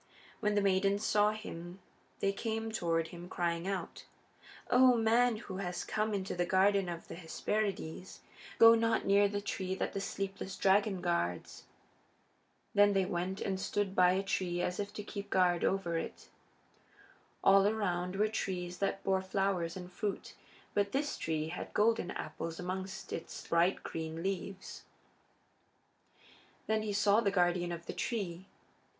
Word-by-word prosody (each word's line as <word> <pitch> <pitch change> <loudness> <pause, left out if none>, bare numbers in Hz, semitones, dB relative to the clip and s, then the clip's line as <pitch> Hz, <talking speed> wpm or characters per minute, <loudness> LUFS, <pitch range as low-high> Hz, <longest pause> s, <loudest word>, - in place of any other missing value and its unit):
When 210 -1 +1
the 205 - +3
maidens 195 +1 +2
saw 210 0 +4
him 185 -4 -7 0.4
they 195 - +2
came 225 +1 -3
toward 165 -5 0
him 175 0 -9
crying 170 0 -1
out: 190 -4 -4 0.7
"O 250 -1 +6
man 230 +1 +3
who 205 -3 -7
has 180 -2 -3
come 215 0 -1
into 195 -1 -3
the 175 - +1
Garden 190 +1 +3
of 170 -1 -6
the - - -8
Hesperides, 185 0 -3 0.4
go 230 0 +9
not 230 0 +2
near 200 +1 +5
the 205 0 -3
tree 190 -2 -3
that - - -2
the 195 - -2
sleepless 195 -1 -4
dragon 195 -1 +3
guards!" 170 - -2 1.1
Then 205 0 +5
they 195 -1 +2
went 185 +2 -3
and 190 -1 -1
stood 200 0 -1
by 180 0 +5
a 190 +1 0
tree 180 -2 -1
as 180 +2 -1
if 205 0 -3
to 210 - -6
keep 200 -1 -7
guard 180 -2 +3
over 175 -4 +1
it. - - -8 1.1
All 195 +1 +6
around 180 -4 -1
were 210 +2 +3
trees 180 -4 -3
that 195 0 -1
bore 190 -1 +2
flowers 190 -3 -1
and 180 0 -8
fruit, 205 +1 -3 0.4
but 200 -1 0
this 285 +2 0
tree 155 -1 -2
had 175 - -7
golden 220 -3 +2
apples 165 -2 -5
amongst 190 +1 -5
its 165 - -6
bright 170 +3 +2
green 160 0 -5
leaves. 195 0 -4 1.8
Then 220 0 +1
he 215 -1 -2
saw 205 +2 +4
the 205 - +2
guardian 175 -2 +1
of 170 0 -6
the - - -5
tree. 190 -5 -3
195 Hz, 155 wpm, -33 LUFS, 175-205 Hz, 1.8 s, go